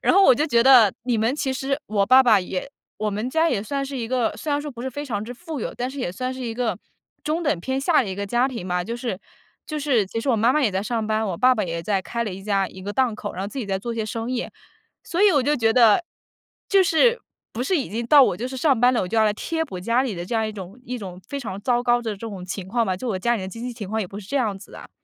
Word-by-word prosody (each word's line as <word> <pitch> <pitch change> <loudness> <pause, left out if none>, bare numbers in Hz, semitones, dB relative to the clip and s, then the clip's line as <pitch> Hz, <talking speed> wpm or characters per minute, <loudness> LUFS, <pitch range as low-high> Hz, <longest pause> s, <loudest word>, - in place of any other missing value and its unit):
然 - - +3
后 395 - +6
我 260 - +7
就 300 +5 0
觉 235 -6 +3
得 245 -7 +7
你 240 -3 +1
们 225 +5 +1
其 270 -3 -1
实 270 +2 -2
我 200 -2 +1
爸 260 +2 +7
爸 230 -5 +5
也 185 +7 -5 0.3
我 215 0 -1
们 210 +5 -3
家 325 +3 +3
也 205 -8 0
算 275 +4 -2
是 275 0 -6
一 235 -3 -3
个， 250 -3 0
虽 310 - -5
然 285 - +1
说 295 0 -6
不 240 -1 -9
是 265 - -2
非 290 +4 -5
常 210 -6 -3
之 245 +3 -7
富 320 0 -7
有， - - -4
但 250 +2 -3
是 280 - -9
也 210 - -2
算 255 +6 -3
是 260 - -8
一 230 -2 -4
个 240 -2 -1 0.5
中 320 +3 -1
等 285 - 0
偏 265 +8 -2
下 300 +1 +3
的 220 - -5
一 - - -3
个 200 +1 -3
家 240 +5 +2
庭 230 -8 -6
吧， 180 0 -1
就 230 - -4
是 240 -6 -4 0.5
就 305 -1 -4
是 255 -9 +1
其 225 +4 -4
实 270 - -4
我 240 - +3
妈 230 +4 +3
妈 305 - +2
也 220 - +3
在 190 +1 -1
上 225 0 -2
班， 220 0 0
我 185 - -3
爸 255 +2 +5
爸 215 - -1
也 170 -1 -4
在 200 -1 0
开 235 +3 -3
了 210 - -4
一 195 +1 -8
家 195 -2 0
一 185 - -12
个 205 +1 -4
档 255 -3 +1
口， 210 -1 -6
然 185 - -5
后 200 - -3
自 275 - -7
己 250 - -2
在 195 -1 -1
做 235 +4 -4
一 - - -7
些 220 - -1
生 225 +3 -4
意， 255 -1 -2 0.5
所 345 - -3
以 415 -3 +6
我 285 -3 +3
就 295 +3 +1
觉 225 -2 +2
得， 235 +7 +5 0.6
就 390 -1 +5
是， 470 +9 +3 0.3
不 240 - -3
是 365 +6 +1
已 275 - -2
经 230 +2 -3
到 290 +2 +8
我 215 - +2
就 235 +6 -4
是 260 - -6
上 270 -4 +2
班 250 +1 +5
了， 235 - +1
我 180 - -4
就 225 - -2
要 220 - +5
来 210 - +3
贴 320 +9 -2
补 185 - -7
家 230 +7 +2
里 255 -6 -2
的 175 -1 -5
这 230 - -4
样 220 -1 +1
一 215 - -5
种 195 +2 -9
一 250 - -4
种 185 -3 -8
非 280 0 -4
常 200 -5 -6
糟 245 0 +1
糕 240 0 +3
的 225 -2 -2
这 - - -7
种 195 -4 -7
情 185 0 -6
况 235 +1 +1
吧， 185 -1 -1
就 245 +7 -5
我 190 -5 -1
家 240 +5 +1
里 200 - -5
的 190 - -5
经 230 +5 -8
济 250 - -4
情 220 -5 -7
况 220 +2 -1
也 205 - -2
不 200 +3 -8
是 190 - -14
这 280 - -1
样 220 -7 0
子 195 - -14
的。 - - -11
235 Hz, 350 characters per minute, -23 LUFS, 205-265 Hz, 0.6 s, 到